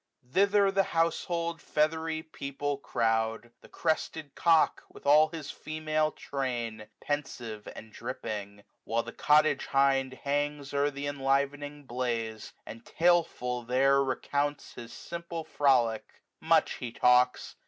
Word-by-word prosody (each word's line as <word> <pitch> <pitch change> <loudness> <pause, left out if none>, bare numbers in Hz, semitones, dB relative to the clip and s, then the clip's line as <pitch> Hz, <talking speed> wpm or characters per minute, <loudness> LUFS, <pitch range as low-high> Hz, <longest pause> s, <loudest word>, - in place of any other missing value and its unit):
Thither 200 +3 +4
the 195 0 +3 0.2
household 170 0 0
feathery 160 +1 0
people 145 -2 -4
crowds 115 -2 0
The - - -16
crested 160 -2 -2
cock^ 165 -2 +3
with - - -15
aU 150 +2 +6
his 155 -3 -7
female 155 0 -1
train, 120 -6 -4
Pensive, 120 -7 -4
and 110 0 -11
dripping; 100 -4 -6 0.2
while 115 +1 -1
the - - -8
cottage 150 +1 +3
hind 135 -1 +2
Hangs 145 0 -2
o'er 140 +1 +2
th' 140 0 -6
enlivening 145 +1 -1
blaze, 120 -4 -3
and 115 +1 -10
taleful 165 -8 +1
there 130 +3 +3
90 140 -1 +2
Recounts 145 +3 -2
his 120 0 -9
simple 170 -1 -6
frolic: 125 -8 +1 0.2
much - - +3
he 120 - -5
talks. 125 +1 +3
140 Hz, 125 wpm, -29 LUFS, 125-155 Hz, 0.2 s, aU